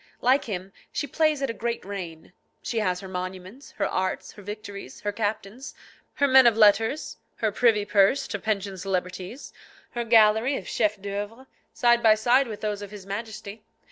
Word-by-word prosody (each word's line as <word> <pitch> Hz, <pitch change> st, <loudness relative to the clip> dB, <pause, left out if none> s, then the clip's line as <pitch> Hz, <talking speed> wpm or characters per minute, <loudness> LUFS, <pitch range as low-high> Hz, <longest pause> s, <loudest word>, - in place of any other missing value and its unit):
Like 260 Hz, +3 st, +3 dB
him, 195 Hz, -2 st, -5 dB, 0.2 s
she -, -, -2 dB
plays 305 Hz, 0 st, +1 dB
at 270 Hz, -, 0 dB
a -, -, -7 dB
great 235 Hz, 0 st, -3 dB
reign; 175 Hz, -5 st, -7 dB, 0.3 s
she 230 Hz, -, -1 dB
has 185 Hz, -4 st, 0 dB
her 190 Hz, -, -8 dB
monuments, 185 Hz, +6 st, -7 dB
her 200 Hz, -, -1 dB
arts, 185 Hz, 0 st, -2 dB
her 210 Hz, -, -13 dB
victories, 205 Hz, 0 st, -8 dB
her 205 Hz, -, -1 dB
captains, 220 Hz, +6 st, -4 dB, 0.4 s
her 285 Hz, -, +3 dB
men 260 Hz, -2 st, +7 dB
of 225 Hz, -2 st, +3 dB
letters, 225 Hz, +6 st, +3 dB, 0.2 s
her 220 Hz, -2 st, 0 dB
privy 215 Hz, -1 st, +3 dB
purse 205 Hz, +6 st, +3 dB
to 210 Hz, -, -3 dB
pension 200 Hz, -2 st, -2 dB
celebrities, 185 Hz, +5 st, -4 dB, 0.4 s
her 240 Hz, -, -2 dB
gallery 225 Hz, +3 st, +4 dB
of -, -, -8 dB
chefs 210 Hz, -2 st, +1 dB
d'oeuvre, 205 Hz, +5 st, -6 dB, 0.3 s
side 240 Hz, -1 st, +3 dB
by 220 Hz, -2 st, +6 dB
side 245 Hz, +5 st, +3 dB
with 215 Hz, -2 st, -7 dB
those 210 Hz, -1 st, -2 dB
of 205 Hz, -, -7 dB
his 205 Hz, -2 st, -10 dB
Majesty. 210 Hz, +1 st, -6 dB
210 Hz, 175 wpm, -26 LUFS, 195-235 Hz, 0.4 s, men